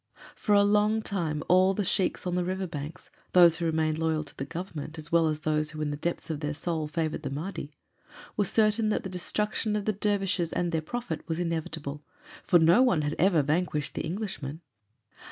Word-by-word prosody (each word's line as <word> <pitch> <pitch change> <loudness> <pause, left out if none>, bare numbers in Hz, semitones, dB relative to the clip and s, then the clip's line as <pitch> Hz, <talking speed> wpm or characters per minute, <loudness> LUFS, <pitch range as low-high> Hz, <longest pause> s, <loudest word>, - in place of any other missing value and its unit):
For 210 - +2
a 200 - +6
long 210 +2 +3
time 165 -8 -2
all 185 +2 +5
the 205 - -1
sheiks 185 +1 +1
on 180 - -1
the 180 0 +1
river 185 +1 -2
banks, 150 -2 -7 0.2
those 170 -2 +7
who 170 - -2
remained 160 -1 0
loyal 160 -1 0
to 145 - -14
the 135 - -4
Government 165 -1 -6
as 155 +2 -3
well 165 -1 +4
as 155 0 -2
those 155 -1 0
who 155 0 -6
in 145 - -1
the - - -2
depth 170 +2 -3
of 150 - -3
their 150 0 -3
souls 160 -1 -2
favored 155 0 -2
the 140 - -4
Mahdi, 155 0 -5 0.6
were 210 - +2
certain 215 +2 +2
that - - 0
the 190 - -5
destruction 210 +4 -1
of 210 -1 -2
the 215 - +1
dervishes 195 -4 0
and 175 -1 -1
their 160 -2 0
prophet 170 -1 -4
was 160 0 -2
inevitable, 160 -4 -3 0.4
for 175 - +5
no 170 +8 +6
one 240 -12 +3
had 145 +1 -1
ever 175 -4 +4
vanquished 150 0 -1
the - - -3
Englishmen. 165 -4 -4
170 Hz, 210 wpm, -28 LUFS, 155-195 Hz, 0.6 s, those